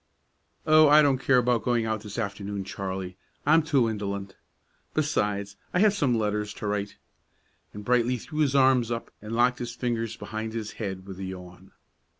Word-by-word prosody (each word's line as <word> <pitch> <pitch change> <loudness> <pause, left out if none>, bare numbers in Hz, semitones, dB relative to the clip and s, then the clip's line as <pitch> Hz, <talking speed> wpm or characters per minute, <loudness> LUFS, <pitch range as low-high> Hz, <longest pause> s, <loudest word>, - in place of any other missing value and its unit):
"Oh, 155 -1 +6
I 150 +1 +7
don't 135 -3 +3
care 135 -1 +3
about 125 -2 +2
going 120 -2 +1
out 110 -1 -2
this 105 0 -8
afternoon, 100 -2 -3
Charley; 95 -1 -5 0.3
I'm 160 +3 +5
too 140 -6 +2
indolent. 100 -3 -4 0.6
Besides, 105 -9 -1 0.2
I - - +4
have 210 -1 +5
some 140 - +1
letters 105 -1 -1
to - - -7
write;" 105 0 -2 0.7
and 105 0 -9
Brightly 125 +1 +2
threw 150 +6 -7
his 140 -3 +2
arms 130 -3 +4
up 115 -1 -4
and 105 +2 -7
locked 125 +1 +3
his 120 -1 -5
fingers 115 -2 -2
behind 110 0 -5
his 110 -2 -4
head 95 -3 -4
with 95 -1 -9
a - - -5
yawn. 90 0 -10
110 Hz, 175 wpm, -27 LUFS, 100-125 Hz, 0.7 s, I